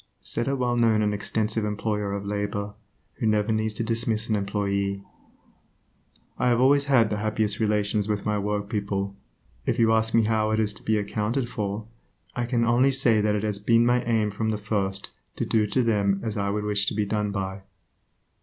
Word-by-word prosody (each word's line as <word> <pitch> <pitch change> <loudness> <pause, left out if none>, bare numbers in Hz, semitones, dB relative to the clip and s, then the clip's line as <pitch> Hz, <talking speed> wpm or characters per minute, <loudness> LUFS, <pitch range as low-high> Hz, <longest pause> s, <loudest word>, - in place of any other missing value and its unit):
Said 120 - -2
a 140 - +1
well 125 -2 0
known 115 -2 +3
and 105 0 +1
extensive 105 +2 -1
employer 105 -1 -2
of 100 0 -4
labor, 105 0 -3 0.5
who 115 - 0
never 105 0 +2
needs 110 0 0
to 115 - -2
dismiss 115 -1 0
an 110 - +2
employee: 100 -1 -1 1.4
"I - - +2
have 120 -1 +3
always 140 +2 +4
had 120 -6 +3
the 105 - 0
happiest 110 -1 0
relations 105 -1 +1
with 105 -1 -1
my 105 -1 0
workpeople. 100 -1 -2 0.5
If 115 - +1
you 115 -2 +4
ask 110 0 +2
me 115 - +5
how 110 0 +1
it 110 0 +1
is 105 -1 +1
to 105 - -15
be 110 0 +1
accounted 110 +5 -1
for, 105 0 -3 0.5
I 120 -1 -2
can 120 -2 +1
only 120 +4 +4
say 125 -5 +3
that 105 0 +1
it 105 - -2
has 105 -2 -1
been 115 +3 +3
my 120 0 +2
aim 110 -3 +1
from 110 +2 -2
the 110 - -1
first 100 -2 -2 0.2
to - - -2
do 110 -2 +2
to 125 +5 +1
them 100 -4 +1
as 110 -2 -3
I 100 -2 -1
would 105 +1 -1
wish 105 -1 +1
to - - 0
be 105 -1 0
done 105 0 -1
by." 95 -1 -4
105 Hz, 200 wpm, -25 LUFS, 100-115 Hz, 1.4 s, me